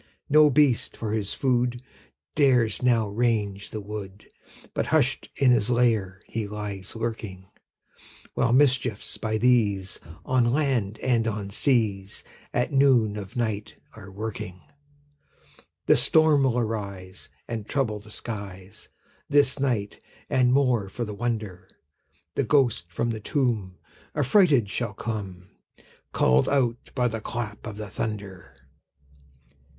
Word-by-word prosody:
No 150 Hz, 0 st, +7 dB
beast, 140 Hz, -3 st, +2 dB
for 110 Hz, -2 st, -3 dB
his 105 Hz, -3 st, -2 dB
food, 125 Hz, -2 st, +1 dB, 0.5 s
Dares 125 Hz, -6 st, +3 dB
now 120 Hz, -4 st, +3 dB
range 105 Hz, -2 st, -1 dB
the 110 Hz, -, -5 dB
wood, 100 Hz, -1 st, -8 dB, 0.5 s
But -, -, -1 dB
hush'd -, -, +1 dB
in 135 Hz, -2 st, +4 dB
his 115 Hz, -2 st, +2 dB
lair 110 Hz, -6 st, +1 dB
he 110 Hz, -2 st, -4 dB
lies 100 Hz, -2 st, -6 dB
lurking; 110 Hz, -5 st, -5 dB, 0.9 s
While 120 Hz, -, +1 dB
mischiefs, 125 Hz, -4 st, +2 dB
by 110 Hz, 0 st, -1 dB
these, 105 Hz, -6 st, +2 dB, 0.3 s
On 125 Hz, -2 st, +2 dB
land 125 Hz, -8 st, 0 dB
and 115 Hz, -3 st, +2 dB
on 105 Hz, -2 st, -3 dB
seas, 105 Hz, -5 st, 0 dB, 0.3 s
At 125 Hz, +5 st, 0 dB
noon 130 Hz, -6 st, +4 dB
of 105 Hz, +3 st, -7 dB
night 110 Hz, -4 st, -2 dB, 0.2 s
are 95 Hz, -, -12 dB
a -, -, -11 dB
working. 95 Hz, -3 st, -6 dB, 1.2 s
The -, -, +6 dB
storm 155 Hz, -3 st, +4 dB
will 125 Hz, -2 st, +1 dB
arise, 100 Hz, -5 st, -4 dB, 0.2 s
And 110 Hz, -3 st, -5 dB
trouble 120 Hz, -7 st, 0 dB
the 105 Hz, +1 st, -15 dB
skies 100 Hz, -4 st, -7 dB, 0.4 s
This 145 Hz, -1 st, +3 dB
night; 115 Hz, -7 st, -1 dB, 0.3 s
and, 125 Hz, -1 st, +3 dB
more 125 Hz, -7 st, +2 dB
for 120 Hz, +4 st, -4 dB
the 105 Hz, -, -6 dB
wonder, 110 Hz, -4 st, -4 dB, 0.6 s
The -, -, 0 dB
ghost 120 Hz, -, +2 dB
from 115 Hz, +7 st, -1 dB
the 110 Hz, -, -4 dB
tomb 105 Hz, -7 st, -1 dB, 0.4 s
Affrighted 145 Hz, -, +4 dB
shall 120 Hz, +3 st, -3 dB
come, 95 Hz, -5 st, -5 dB, 0.6 s
Call'd 65 Hz, +1 st, +3 dB
out 125 Hz, -4 st, 0 dB
by 125 Hz, -2 st, +2 dB
the 115 Hz, -2 st, -4 dB
clap 110 Hz, -2 st, -5 dB
of 105 Hz, -2 st, -7 dB
the 105 Hz, -1 st, -6 dB
thunder. 100 Hz, -8 st, -5 dB
110 Hz, 130 wpm, -26 LUFS, 100-125 Hz, 1.2 s, No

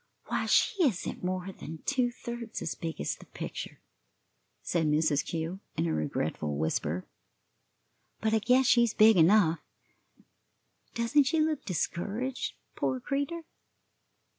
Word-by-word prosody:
"Why, -, -, 0 dB
she 385 Hz, -, +3 dB
isn't 220 Hz, -, -1 dB
more 185 Hz, +1 st, -2 dB
than 160 Hz, -3 st, -9 dB
two 255 Hz, -3 st, +2 dB
thirds 235 Hz, -2 st, -6 dB
as 155 Hz, -, -2 dB
big 165 Hz, -1 st, -5 dB
as -, -, -1 dB
the -, -, -16 dB
picture," -, -, -6 dB, 0.8 s
said 165 Hz, -3 st, 0 dB
Mrs. 150 Hz, -1 st, +2 dB
Kew, 165 Hz, +3 st, -4 dB, 0.2 s
in -, -, +1 dB
a 80 Hz, -, 0 dB
regretful 75 Hz, -1 st, -2 dB
whisper; 80 Hz, +2 st, -1 dB, 1.1 s
"but 220 Hz, 0 st, 0 dB
I 220 Hz, -, +4 dB
guess 250 Hz, +5 st, +4 dB
she's 235 Hz, -2 st, +4 dB
big 220 Hz, 0 st, +7 dB
enough; 170 Hz, -1 st, +5 dB, 1.4 s
doesn't 250 Hz, +5 st, +3 dB
she 320 Hz, +4 st, +1 dB
look 310 Hz, -2 st, 0 dB
discouraged, 210 Hz, +8 st, -2 dB, 0.2 s
poor 260 Hz, -, -1 dB
creatur'?" 285 Hz, +6 st, -2 dB
210 Hz, 130 wpm, -30 LUFS, 160-255 Hz, 1.4 s, big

